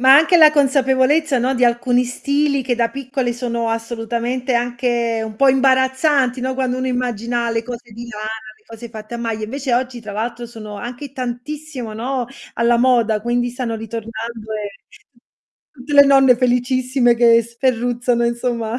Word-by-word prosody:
ma 265 +1 +7
anche 325 +4 +5
la 310 -2 +8
consapevolezza, 275 0 +2
no, 255 +2 0
di 250 -1 +2
alcuni 245 +1 +2
stili 280 +3 0
che 245 -1 0
da 230 -1 0
piccoli 260 -2 -3
sono 235 -1 -3
assolutamente 235 +2 -2
anche 240 -1 0
un 215 -1 -8
po' 275 - +3
imbarazzanti, 260 0 +2
no, 260 +1 -2
quando 255 -1 -1
uno 260 - -2
immagina 240 -1 -2
le 230 0 -1
cose 240 -1 -9
di 235 +2 -9
lana, 215 -1 -6 0.3
le 215 - -32
cose 230 +1 -10
fatte 220 0 -9
a - - -2
maglia, 225 -2 -3
invece 265 +3 -4
oggi 250 -1 -2
tra 215 -2 -8
l'altro 235 +3 -4
sono 215 -3 -9
anche 245 +6 -7
tantissimo, 255 0 -6
no, 245 +3 -3 0.3
alla 235 0 +2
moda, 235 -4 +2
quindi 240 +2 0
stanno 240 -2 -4
ritornando 225 0 -7
e 210 -1 -4 1.0
tutte 280 +1 -10
le 285 0 +9
nonne 270 -2 +6
felicissime 250 0 +2
che 235 -1 +5
sferruzzano 240 0 0
insomma, 235 -1 -2
245 Hz, 165 wpm, -19 LUFS, 230-260 Hz, 1.0 s, le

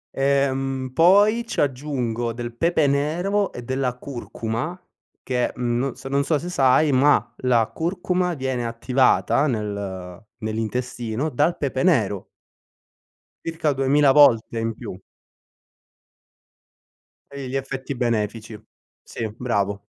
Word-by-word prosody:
Ehm, 135 -1 0
poi 205 - +5
ci - - -4
aggiungo 125 -4 -2
del 120 0 -6
pepe 165 +2 +2
nero 175 +9 0
e 120 - -7
della 130 0 -2
curcuma 125 +4 -5 0.4
che, 125 -1 0
mhmm, 120 -1 -1
no 135 0 -1
s 130 +1 -15
non 140 +1 +1
so 150 +1 +1
se 175 +4 -6
sai, 140 -1 +3
ma 140 +3 +3
la 120 -3 +2
curcuma 180 +1 -1
viene 130 -3 -2
attivata 130 +4 +2
nel 100 -6 -4 0.2
nell'intestino, 115 +4 -3
dal 150 +5 +1
pepe 135 -2 -2
nero. 110 - +1 1.2
Circa 160 -3 -1
2000 135 +1 +3
volte 120 -5 +5
in 115 0 -1
più. 90 - -8 2.3
Toglie 140 -2 -6
gli 135 - -4
effetti 135 0 -4
benefici. 110 -2 -2 0.4
Sì, 110 - -5
bravo. 100 -4 -1
130 Hz, 115 wpm, -23 LUFS, 115-145 Hz, 2.3 s, poi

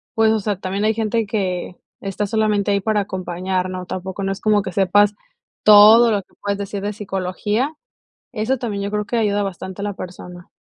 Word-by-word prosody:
pues, 220 -1 +4
o 220 - +2
sea, 205 -2 -2
también 195 +2 -3
hay 220 +1 +3
gente 225 0 0
que 185 -4 -2 0.3
está 195 +1 -3
solamente 210 -1 +1
ahí 200 0 +1
para 215 +1 +1
acompañar, 185 -1 -3
¿no?, 185 0 -5
tampoco 190 +2 -5
no 195 - -1
es 195 - -5
como 210 -1 +3
que 185 - -5
sepas 200 +2 +3 0.5
todo 215 +3 +8
lo 205 - +1
que - - -33
puedes 200 0 -1
decir 200 0 -5
de 205 +1 -3
psicología. 205 +7 -2 0.6
Eso 240 +3 0
también 215 -5 -3
yo 200 - -3
creo 210 0 -1
que 235 - -3
ayuda 205 -2 +1
bastante 190 0 -6
a - - -2
la 205 - -2
persona. 180 -1 -9
205 Hz, 205 wpm, -20 LUFS, 190-215 Hz, 0.6 s, todo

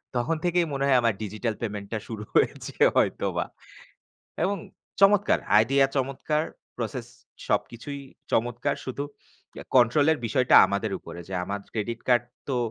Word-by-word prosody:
তখন 125 +7 +1
থেকেই 175 0 +2
মনে 135 - -1
হয় 130 -2 +5
আমার 115 -1 +2
digital 110 +2 -2
payment 105 -3 -4
টা 110 - -1
শুরু 110 -2 -6
হয়েছে - - +1 0.2
হয়তো - - +2
বা। - - +1 1.0
এবং 200 +1 +1 0.4
চমৎকার 205 +1 +5 0.2
idea 135 +4 +3
চমৎকার। 140 +3 0 0.3
Process - - -4 0.4
সবকিছুই 140 +5 -2 0.3
চমৎকার। 120 +4 0
শুধু 135 +2 -3 0.7
control 125 +4 +5
এর 155 - +1
বিষয়টা 125 +3 +3
আমাদের 100 +1 -2
উপরে। - - -10
যে - - -6
আমার 100 +2 -3
Credit 115 +1 -3
card 120 -1 +4 0.3
তো 130 - 0
125 Hz, 140 wpm, -26 LUFS, 110-140 Hz, 1.0 s, হয়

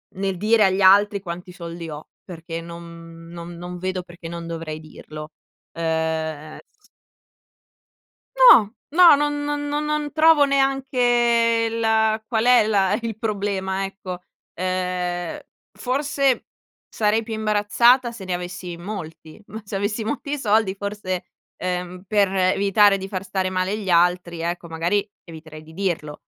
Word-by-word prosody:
nel 195 -1 -2
dire 215 +2 +3
agli 190 +1 +1
altri 200 +1 +5
quanti 180 0 -7
soldi 170 -1 -8
ho, 150 0 -9 0.2
perché 165 -2 -7
non 165 0 -11
non 170 0 -8
non 175 +1 -7
vedo 185 0 -3
perché 175 -1 -11
non 170 0 -7
dovrei 160 -2 -6
dirlo. 155 0 -10 0.4
Uhm, 160 -2 -2 0.2
s 420 - -28 1.5
No, 365 - +7 0.2
no, 340 0 +7
non 290 0 -1
non 290 0 -2
non 295 +1 -2
non 300 -1 -2
trovo 315 -1 +5
neanche 245 -4 +2
la 220 -1 +1
qual 225 -1 0
è 245 -3 +6
la 195 -3 +2
il 225 -2 -4
problema 195 -3 -2
ecco. 185 -2 -7 0.3
Uhm, 180 -1 -2 0.3
forse 275 0 0 0.4
sarei 215 +1 +1
più 225 0 -6
imbarazzata 220 +4 +3
se 220 -5 -10
ne 185 - -2
avessi 175 0 -5
molti, 170 -2 -8
ma 220 +1 -8
se 200 -1 -7
avessi 205 +3 -2
molti 285 +6 -3
soldi 215 -5 +1
forse, 200 -2 -4 0.3
ehm, 180 0 -4
per 205 0 +3
evitare 195 +2 +3
di 190 0 -6
far 195 -1 -4
stare 190 -1 -2
male 185 +2 -1
gli 195 -3 -5
altri 175 0 +2
ecco, 170 +1 -3
magari 170 +5 -1 0.2
eviterei 155 -2 -11
di 160 +1 -15
dirlo. 165 -5 -3
195 Hz, 140 wpm, -22 LUFS, 175-225 Hz, 1.5 s, No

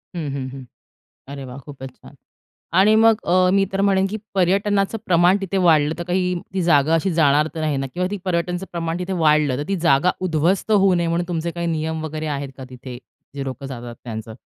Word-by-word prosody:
हं, 160 -4 -3
हं. 135 -2 -4
हं. 135 0 -9 0.6
अरे 140 -1 -7
वाह! 125 +1 -9
खूपच 135 -2 -9
छान! - - -16 0.6
आणि 205 +3 +5
मग 225 0 +4
अ, 180 +1 +3
मी 195 0 +3
तर 195 - -1
म्हणेन 195 -1 +3
की 215 - -3 0.2
पर्यटनाचं 195 +3 +1
प्रमाण 175 +1 +4
तिथे 195 0 -3
वाढलं 155 -2 +4
तर - - -3
काही 180 +1 0 0.2
ती 190 - 0
जागा 155 -2 +3
अशी 165 +4 +1
जाणार 150 -1 +3
तर 160 - -4
नाही 155 -2 0
ना? 135 0 -2
किंवा 180 +1 -1
ती 205 - -2
पर्यटनाचं 180 0 -2
प्रमाण 165 -1 -3
तिथे 180 +1 -4
वाढलं 150 -4 +3
तर 145 - -2
ती 195 - 0
जागा 140 +6 +4 0.2
उध्वस्त 170 +5 0
होऊ 195 -2 +4
नये 170 -1 0
म्हणून 170 +1 -1
तुमचे 170 -1 -2
काही 170 0 -4
नियम 160 -1 -2
वगैरे 155 0 -4
आहेत 140 -1 -5
का 130 - -8
तिथे? 125 -1 -9 0.4
जे 140 - -3
लोकं 135 +1 -6
जातात 120 -3 -7
त्यांचं. 110 -2 -7
165 Hz, 210 wpm, -21 LUFS, 140-185 Hz, 0.6 s, आणि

